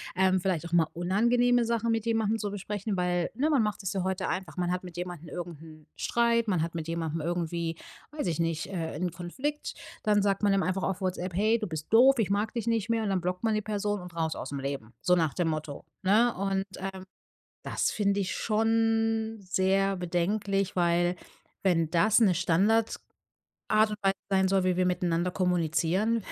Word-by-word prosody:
ähm, 185 Hz, 0 st, +3 dB
vielleicht 175 Hz, -3 st, -1 dB
auch -, -, -13 dB
mal 170 Hz, -2 st, +4 dB
unangenehme 235 Hz, +7 st, +2 dB
Sachen 230 Hz, 0 st, 0 dB
mit 225 Hz, 0 st, 0 dB
jemandem 225 Hz, -1 st, +1 dB
zu 210 Hz, -2 st, -3 dB
besprechen, 205 Hz, +1 st, -3 dB
weil 180 Hz, -1 st, 0 dB
ne, 280 Hz, +8 st, 0 dB
man 275 Hz, -7 st, +3 dB
macht 210 Hz, -1 st, -2 dB
sich's 190 Hz, -1 st, -3 dB
ja 190 Hz, -2 st, -1 dB
heute 190 Hz, 0 st, -1 dB
einfach. 185 Hz, -4 st, -4 dB
Man 180 Hz, -1 st, -1 dB
hat 180 Hz, 0 st, -2 dB
mit 175 Hz, -2 st, -10 dB
jemandem 175 Hz, -2 st, -6 dB
irgend 170 Hz, -3 st, -6 dB
'n 155 Hz, -1 st, -14 dB
Streit, 235 Hz, -1 st, +1 dB
man 185 Hz, -6 st, +1 dB
hat 165 Hz, +1 st, -3 dB
mit 165 Hz, -1 st, -4 dB
jemandem 165 Hz, -1 st, -2 dB
irgendwie, 170 Hz, 0 st, -2 dB, 0.4 s
weiß 295 Hz, -10 st, -3 dB
ich 165 Hz, -2 st, -1 dB
nicht, 165 Hz, -1 st, -1 dB
äh, 165 Hz, -6 st, -4 dB
'n 180 Hz, -1 st, 0 dB
Konflikt, 260 Hz, -, -4 dB, 0.3 s
dann 210 Hz, -1 st, +3 dB
sagt 200 Hz, 0 st, 0 dB
man 205 Hz, -, +4 dB
dem 195 Hz, 0 st, +3 dB
einfach 185 Hz, +1 st, -1 dB
auf 195 Hz, 0 st, -2 dB
Whatsapp: 185 Hz, -1 st, -2 dB
„Hey, 215 Hz, +4 st, +3 dB
du 220 Hz, -, -3 dB
bist 160 Hz, -1 st, -6 dB
doof, 255 Hz, +3 st, +6 dB
ich 215 Hz, -, +1 dB
mag 205 Hz, +2 st, 0 dB
dich 235 Hz, -2 st, -3 dB
nicht 230 Hz, -2 st, 0 dB
mehr“ 230 Hz, -, +1 dB
Und 215 Hz, -, -1 dB
dann 190 Hz, -2 st, 0 dB
blockt 180 Hz, +2 st, -3 dB
man 220 Hz, -1 st, +2 dB
die 215 Hz, -, -1 dB
Person 205 Hz, -1 st, -1 dB
und 180 Hz, -1 st, -11 dB
raus 160 Hz, -1 st, -1 dB
ausm 140 Hz, -1 st, -5 dB
Leben. 135 Hz, -4 st, -5 dB
So 180 Hz, -, +4 dB
nach 160 Hz, -5 st, +1 dB
dem 175 Hz, -2 st, 0 dB
Motto, 155 Hz, -2 st, -4 dB, 0.2 s
ne? 220 Hz, +5 st, +4 dB
Und, 195 Hz, 0 st, -1 dB
ähm, 190 Hz, 0 st, -6 dB, 0.6 s
das -, -, 0 dB
finde 200 Hz, -1 st, +1 dB
ich 190 Hz, -, -2 dB
schon 225 Hz, 0 st, +1 dB
sehr 190 Hz, +1 st, +1 dB
bedenklich, 190 Hz, +2 st, -1 dB
weil 175 Hz, +1 st, +2 dB, 0.4 s
wenn 165 Hz, -4 st, +2 dB
das 215 Hz, +6 st, +4 dB
'ne 200 Hz, -5 st, +5 dB
Standard 200 Hz, +7 st, +2 dB, 0.7 s
Art 215 Hz, 0 st, +4 dB
und 210 Hz, -, -4 dB
Weise 195 Hz, 0 st, +3 dB, 0.2 s
sein 190 Hz, -1 st, +3 dB
soll, 195 Hz, -1 st, +2 dB
wie 185 Hz, -1 st, +2 dB
wir 185 Hz, -, +3 dB
miteinander 180 Hz, -1 st, 0 dB
kommunizieren, 180 Hz, +5 st, +1 dB
190 Hz, 205 wpm, -28 LUFS, 175-215 Hz, 0.7 s, doof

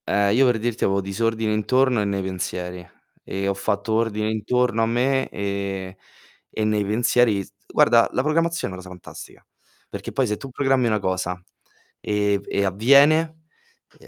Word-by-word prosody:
Ehm, 100 Hz, 0 st, +2 dB
io 135 Hz, +2 st, +5 dB
per 125 Hz, -2 st, +3 dB
dirti 115 Hz, +1 st, -2 dB
avevo 100 Hz, 0 st, +1 dB
disordine 110 Hz, +3 st, -1 dB
intorno 125 Hz, +2 st, +2 dB
e -, -, -1 dB
nei 100 Hz, -1 st, -2 dB
pensieri 90 Hz, -1 st, -5 dB, 0.4 s
e 100 Hz, 0 st, -4 dB
ho 100 Hz, -, +1 dB
fatto 100 Hz, +2 st, -2 dB
ordine 110 Hz, -1 st, 0 dB
intorno 115 Hz, +2 st, 0 dB
a -, -, +3 dB
me, 130 Hz, +3 st, +1 dB
ehm, 100 Hz, -1 st, -4 dB, 0.5 s
e 110 Hz, -, -3 dB
nei 105 Hz, -1 st, +1 dB
pensieri 110 Hz, 0 st, +2 dB
s -, -, -17 dB, 0.2 s
guarda, 115 Hz, -1 st, +4 dB
la -, -, 0 dB
programmazione 165 Hz, -, 0 dB
è -, -, -7 dB
una 95 Hz, -, -10 dB
cosa 90 Hz, -, -11 dB
fantastica. 90 Hz, -1 st, -12 dB, 0.4 s
Perché -, -, -7 dB
poi 135 Hz, -, +1 dB
se 105 Hz, 0 st, -2 dB
tu 135 Hz, -, -9 dB
programmi 135 Hz, -1 st, +1 dB
una 110 Hz, -2 st, +1 dB
cosa, 90 Hz, -2 st, -2 dB, 0.6 s
ehm, 105 Hz, -1 st, 0 dB
v -, -, -20 dB
e 100 Hz, -, 0 dB
avviene, 140 Hz, -, +4 dB, 0.6 s
eh -, -, -18 dB
110 Hz, 175 wpm, -23 LUFS, 100-125 Hz, 0.6 s, io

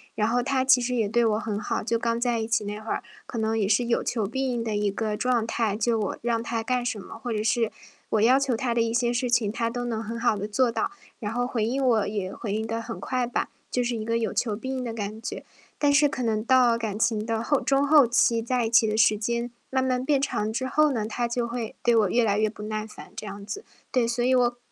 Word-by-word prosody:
然 215 Hz, -, +1 dB
后 245 Hz, +1 st, +2 dB
他 265 Hz, -1 st, +1 dB
其 260 Hz, -2 st, +6 dB
实 250 Hz, +1 st, -1 dB
也 220 Hz, -3 st, +1 dB
对 235 Hz, +1 st, +2 dB
我 215 Hz, -1 st, +2 dB
很 215 Hz, -2 st, -3 dB
好， 205 Hz, -, -2 dB
就 230 Hz, +1 st, 0 dB
刚 230 Hz, 0 st, 0 dB
在 240 Hz, -2 st, +1 dB
一 220 Hz, -, -2 dB
起 225 Hz, -2 st, +1 dB
那 210 Hz, +1 st, -4 dB
会 220 Hz, -, -5 dB
儿， -, -, -1 dB, 0.2 s
可 -, -, -7 dB
能 220 Hz, 0 st, 0 dB
也 200 Hz, -3 st, +1 dB
是 220 Hz, +4 st, +2 dB
有 235 Hz, -, +1 dB
求 225 Hz, -4 st, -1 dB
必 265 Hz, +5 st, -2 dB
应 240 Hz, -, -1 dB
的 220 Hz, -2 st, -2 dB
一 205 Hz, -1 st, +1 dB
个 215 Hz, +1 st, -2 dB
状 245 Hz, -3 st, +1 dB
态， 220 Hz, -4 st, 0 dB
就 225 Hz, +1 st, +1 dB
我 205 Hz, -, -2 dB
让 230 Hz, -1 st, 0 dB
他 230 Hz, -1 st, -2 dB
干 250 Hz, +1 st, 0 dB
什 225 Hz, -3 st, -2 dB
么， -, -, -10 dB
或 240 Hz, -, -5 dB
者 215 Hz, -1 st, -1 dB
是 230 Hz, 0 st, +1 dB, 0.4 s
我 215 Hz, -, +2 dB
要 245 Hz, +4 st, +6 dB
求 275 Hz, -3 st, +1 dB
他 240 Hz, -2 st, -1 dB
的 230 Hz, -, +2 dB
一 230 Hz, 0 st, 0 dB
些 240 Hz, 0 st, +1 dB
事 245 Hz, 0 st, -1 dB
情， 235 Hz, -3 st, +2 dB
他 230 Hz, +2 st, -1 dB
都 245 Hz, +1 st, -4 dB
能 225 Hz, -2 st, -2 dB
很 230 Hz, +2 st, -5 dB
好 235 Hz, -2 st, +2 dB
地 205 Hz, +1 st, -4 dB
做 245 Hz, +3 st, +2 dB
到， 230 Hz, -, -1 dB, 0.3 s
然 215 Hz, -2 st, -4 dB
后 245 Hz, +1 st, 0 dB
回 225 Hz, -4 st, -1 dB
应 265 Hz, +4 st, -1 dB
我 230 Hz, -5 st, +3 dB
也 200 Hz, -2 st, -3 dB
回 205 Hz, -4 st, -4 dB
应 220 Hz, +1 st, -2 dB
得 230 Hz, 0 st, -2 dB
很 230 Hz, 0 st, -6 dB
快 255 Hz, -1 st, -1 dB
吧， 240 Hz, -, -2 dB, 0.2 s
就 250 Hz, -, +1 dB
是 240 Hz, -1 st, -1 dB
一 215 Hz, -, -3 dB
个 230 Hz, +1 st, 0 dB
有 230 Hz, -, -1 dB
求 220 Hz, -4 st, 0 dB
必 260 Hz, +3 st, -5 dB
应 255 Hz, -, -3 dB
的 235 Hz, -2 st, -4 dB
感 215 Hz, 0 st, -5 dB
觉。 -, -, -6 dB, 0.3 s
但 290 Hz, -1 st, +3 dB
是 290 Hz, 0 st, +5 dB
可 260 Hz, -, -4 dB
能 220 Hz, -3 st, 0 dB
到 245 Hz, -1 st, +4 dB
感 215 Hz, -3 st, -3 dB
情 220 Hz, -2 st, +1 dB
的 225 Hz, -1 st, -1 dB
后 280 Hz, +4 st, +1 dB
中 275 Hz, +1 st, +2 dB
后 295 Hz, -2 st, +7 dB
期， 235 Hz, -1 st, +3 dB
在 245 Hz, 0 st, 0 dB
一 225 Hz, -, -1 dB
起 235 Hz, -1 st, +5 dB
的 215 Hz, 0 st, 0 dB
时 215 Hz, -1 st, +4 dB
间 235 Hz, +3 st, -2 dB, 0.2 s
慢 260 Hz, 0 st, +1 dB
慢 255 Hz, -1 st, 0 dB
变 280 Hz, -1 st, +2 dB
长 220 Hz, -6 st, -1 dB
之 260 Hz, +3 st, -2 dB
后 305 Hz, +2 st, +3 dB
呢， 220 Hz, -4 st, -1 dB
他 240 Hz, +2 st, -2 dB
就 235 Hz, 0 st, -1 dB
会 235 Hz, -1 st, -4 dB
对 240 Hz, -1 st, +3 dB
我 210 Hz, -4 st, +3 dB
越 240 Hz, +4 st, +3 dB
来 205 Hz, -1 st, +2 dB
越 215 Hz, 0 st, +2 dB
不 210 Hz, -, -11 dB
耐 215 Hz, 0 st, -3 dB
烦 215 Hz, -, -12 dB
这 -, -, -6 dB
样 200 Hz, 0 st, -7 dB
子。 410 Hz, -, -6 dB, 0.3 s
对， 250 Hz, -3 st, +2 dB
所 240 Hz, +1 st, -1 dB
以 255 Hz, +1 st, +3 dB
我 240 Hz, -1 st, +2 dB
230 Hz, 300 characters per minute, -26 LUFS, 220-245 Hz, 0.4 s, 后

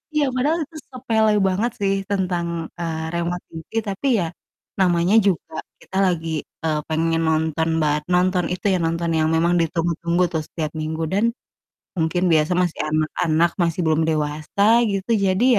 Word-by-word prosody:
Iya, 285 Hz, -3 st, +2 dB
padahal 300 Hz, +6 st, +1 dB
itu 315 Hz, +2 st, -11 dB
sepele 225 Hz, -4 st, +1 dB, 0.2 s
banget 205 Hz, +6 st, 0 dB
sih 195 Hz, 0 st, +2 dB, 0.2 s
tentang, 180 Hz, -3 st, 0 dB, 0.3 s
eee, 160 Hz, -2 st, -3 dB
remote 170 Hz, +1 st, -2 dB
TV 160 Hz, -1 st, -9 dB, 0.2 s
tapi 195 Hz, +8 st, -3 dB
ya, 170 Hz, -, 0 dB, 0.5 s
namanya 175 Hz, +1 st, +3 dB
juga 180 Hz, -4 st, -1 dB, 0.2 s
kita 190 Hz, -, -6 dB
lagi, 165 Hz, -2 st, -1 dB, 0.3 s
eee, 155 Hz, -1 st, 0 dB
pengen 165 Hz, +1 st, 0 dB
nonton 160 Hz, 0 st, 0 dB
bar 150 Hz, 0 st, +2 dB
nonton 180 Hz, 0 st, +2 dB
itu, 180 Hz, -, -7 dB
ya, 185 Hz, -, +1 dB
nonton 165 Hz, +1 st, -1 dB
yang 155 Hz, -, +2 dB
memang 170 Hz, +2 st, +2 dB
ditunggu-tunggu 170 Hz, +1 st, 0 dB
tuh 160 Hz, -, +1 dB
setiap 155 Hz, -3 st, -4 dB
minggu 160 Hz, +1 st, -3 dB
dan 205 Hz, +3 st, +2 dB, 0.7 s
mungkin 160 Hz, +3 st, 0 dB
biasa 155 Hz, +2 st, +3 dB
masih 180 Hz, -2 st, 0 dB
anak-anak, 155 Hz, +2 st, +1 dB
masih 170 Hz, +1 st, 0 dB
belum 160 Hz, 0 st, +2 dB
dewasa 155 Hz, +4 st, -1 dB, 0.2 s
gitu, 195 Hz, +2 st, -2 dB
jadi 190 Hz, +6 st, +2 dB
170 Hz, 155 wpm, -22 LUFS, 160-190 Hz, 0.7 s, namanya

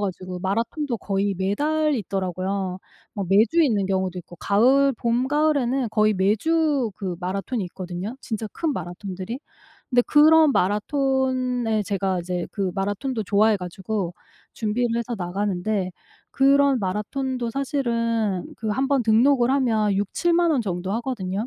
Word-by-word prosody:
가지고 185 Hz, -2 st, -4 dB
마라톤도 230 Hz, -, -1 dB
거의 195 Hz, 0 st, -1 dB
매달 295 Hz, -, +1 dB
있더라고요. 190 Hz, -3 st, -2 dB, 0.4 s
뭐 200 Hz, -, -2 dB
매주 220 Hz, +12 st, +4 dB
있는 215 Hz, -10 st, +2 dB
경우도 190 Hz, -1 st, -1 dB
있고 175 Hz, +1 st, -15 dB
가을 260 Hz, -, +3 dB
봄 235 Hz, +2 st, 0 dB
가을에는 275 Hz, -4 st, +1 dB
거의 215 Hz, 0 st, +3 dB
매주 265 Hz, -, +1 dB
그 185 Hz, -3 st, -4 dB
마라톤이 195 Hz, +5 st, -2 dB
있거든요 185 Hz, +5 st, -6 dB
진짜 220 Hz, -1 st, -4 dB
큰 320 Hz, -3 st, -1 dB
마라톤들이. 185 Hz, -, -6 dB, 0.5 s
근데 245 Hz, -1 st, +4 dB
그런 310 Hz, 0 st, +6 dB
마라톤에 250 Hz, +1 st, 0 dB
제가 190 Hz, -2 st, -1 dB
이제 180 Hz, 0 st, -3 dB
그 195 Hz, -3 st, -1 dB
마라톤도 205 Hz, +5 st, -2 dB
좋아해 210 Hz, +2 st, +3 dB
가지고 185 Hz, +1 st, -4 dB, 0.4 s
준비를 230 Hz, +2 st, -1 dB
해서 235 Hz, +1 st, -3 dB
나가는데 190 Hz, +1 st, -2 dB, 0.4 s
그런 275 Hz, 0 st, +4 dB
마라톤도 235 Hz, +6 st, -2 dB
사실은 230 Hz, -7 st, -1 dB
그 220 Hz, -, -4 dB
1 265 Hz, +6 st, 0 dB
번 280 Hz, -3 st, +2 dB
등록을 240 Hz, +3 st, +4 dB
하면 225 Hz, -7 st, +2 dB
60,000-70,000 335 Hz, -, +1 dB
원 285 Hz, -5 st, +2 dB
정도 185 Hz, -3 st, -3 dB
하거든요. 220 Hz, -4 st, -3 dB
220 Hz, 305 characters per minute, -23 LUFS, 195-265 Hz, 0.5 s, 그런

